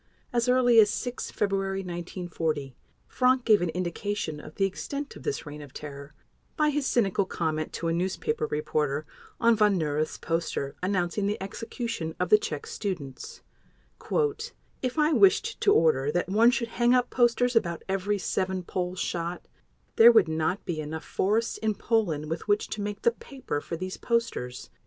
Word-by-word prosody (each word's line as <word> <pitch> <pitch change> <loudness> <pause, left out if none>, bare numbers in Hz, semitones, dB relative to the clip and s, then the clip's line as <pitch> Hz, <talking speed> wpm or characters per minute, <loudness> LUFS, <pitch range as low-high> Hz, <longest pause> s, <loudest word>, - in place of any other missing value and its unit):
As 240 +1 +1
early 245 -2 +5
as 210 -2 +7
6 245 +2 -3
February 195 -1 -1
1940, 170 -6 -4 0.3
Frank 255 0 +2
gave 215 -4 +5
an 175 - 0
indication 180 -1 -3
of 150 0 -11
the 195 - +2
extent 280 +9 -5
of - - -11
this 430 - -3
reign 150 0 -8
of 140 -2 -12
terror 140 -1 -8 0.4
by 305 -2 +3
his 290 -1 -1
cynical 200 -4 +2
comment 155 -3 -2
to 170 - -3
a 165 - +1
newspaper 170 -3 -1
reporter 150 -1 -1 0.3
on 235 -1 +5
Von 210 -2 +3
Neurath's 155 -1 -1
poster 165 -4 -2
announcing 185 +1 0
the 210 - -1
execution 195 -4 -5
of - - 0
the 425 - +8
Czech 455 +1 -4
students: 185 - -5 1.4
"If 255 +1 -2
I 305 +1 +3
wished 395 +6 +3
to 405 - +4
order 145 - +3
that 175 +2 -1
one 220 +5 +5
should 245 -2 -1
hang 240 +2 +3
up 250 -1 +1
posters 245 0 +2
about 170 -7 +1
every 195 +2 0
seven 185 0 -1
Poles 180 +1 -3
shot, 170 +1 -3 0.5
there 230 +1 +10
would 220 -7 +5
not 160 +4 -1
be 170 -4 -3
enough 155 +1 -6
forests 220 +4 0
in 215 -1 0
Poland 180 -12 0
with 165 +4 -4
which 205 0 +1
to 210 - -4
make 205 0 -4
the 235 - +5
paper 240 - -5
for 165 - -5
these 185 +2 -5
posters." 230 - -2
195 Hz, 170 wpm, -27 LUFS, 160-235 Hz, 1.4 s, there